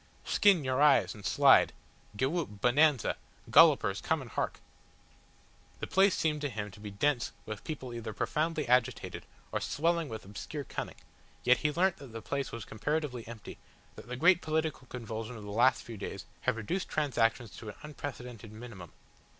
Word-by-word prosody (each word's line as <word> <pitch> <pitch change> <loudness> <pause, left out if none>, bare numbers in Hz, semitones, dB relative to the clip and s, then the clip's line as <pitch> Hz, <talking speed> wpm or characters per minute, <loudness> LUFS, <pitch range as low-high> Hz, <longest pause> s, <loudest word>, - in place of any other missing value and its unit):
"Skin 195 -7 +4
your 130 +1 0
eyes 135 -11 +5
and 105 - -12
slide," - - +5 0.4
"Gewhoop, 135 - -1
Bonanza," 135 +2 +3 0.3
"Gollipers - - +6
come - - 0
and - - -9
hark!" - - -2 1.2
The - - -3
place 195 0 +3
seemed 150 -2 0
to 145 - -1
him 105 -3 -5
to 100 - -14
be 105 0 -7
dense 120 +5 0
with 110 -2 -6
people 130 -6 -6
either 115 -2 -5
profoundly 155 - -1
agitated 125 0 +1 0.2
or - - -1
swelling 165 0 0
with 110 -3 -7
obscure 125 +9 -6
cunning, - - -5 0.5
yet 125 0 +5
he 150 +4 0
learnt 180 +4 +2
that 135 -5 -12
the 115 - -6
place 140 -1 -2
was 115 - -6
comparatively 135 0 -2
empty, 115 -2 -9 0.4
that - - -11
the 125 - -4
great 175 +6 +5
political 155 -4 -2
convulsion 115 -1 -6
of 105 - -9
the 105 - -7
last 125 +5 +3
few 115 -2 -8
days - - -6 0.2
had - - +1
reduced 170 - -3
transactions 120 -6 0
to 110 - -8
an 105 - -8
unprecedented 125 -7 -7
minimum. 110 -6 -10
125 Hz, 170 wpm, -31 LUFS, 110-150 Hz, 1.2 s, Gollipers